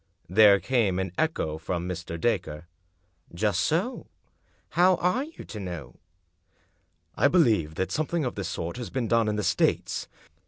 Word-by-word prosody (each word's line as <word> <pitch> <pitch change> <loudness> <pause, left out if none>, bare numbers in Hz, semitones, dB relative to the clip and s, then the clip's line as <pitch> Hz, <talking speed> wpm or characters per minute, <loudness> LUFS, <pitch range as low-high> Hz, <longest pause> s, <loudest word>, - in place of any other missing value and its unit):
There 100 +1 +6
came 115 -8 +1
an 95 -1 -2
echo 80 - -1
from 85 +2 -3
Mr. 85 -2 -5
Dacre. 90 -7 -1 0.7
"Just 100 -1 +1
so 175 - -1 0.3
— - - -40
how 180 +2 +4
are 180 +11 0
you 325 - -11
to 110 - -8
know?" 85 -9 -7 0.6
" - - -41 0.3
I - - +4
believe 110 - +2
that 95 - -2
something 155 0 -1
of 125 - -2
this 100 - -4
sort 85 +6 -4
has 120 -3 -5
been 130 -4 -2
done 115 0 +2
in 105 - 0
the 105 - -2
States." 90 -1 0
105 Hz, 165 wpm, -27 LUFS, 90-135 Hz, 0.7 s, There